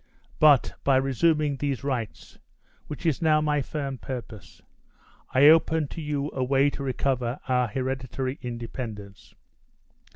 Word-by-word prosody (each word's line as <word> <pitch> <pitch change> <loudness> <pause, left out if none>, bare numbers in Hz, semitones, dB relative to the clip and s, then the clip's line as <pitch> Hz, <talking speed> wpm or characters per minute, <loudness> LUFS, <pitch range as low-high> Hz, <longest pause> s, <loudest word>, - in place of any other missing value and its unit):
But, 150 -4 +5
by 135 - +3
resuming 140 +2 +1
these 140 -2 -2
rights, 125 -6 -5 0.5
which 150 +3 -8
is 160 -5 +1
now 155 -2 +4
my 150 -1 +1
firm 140 -2 -5
purpose, 115 -6 -8 0.7
I 130 +2 +5
open 160 -1 +4
to 165 - -7
you 145 -1 -3
a 130 - -1
way 135 +2 +2
to 140 - -7
recover 130 -1 -1
our 125 -1 +2
hereditary 130 +2 -3
independence. 115 -5 -7
135 Hz, 130 wpm, -26 LUFS, 125-150 Hz, 0.7 s, But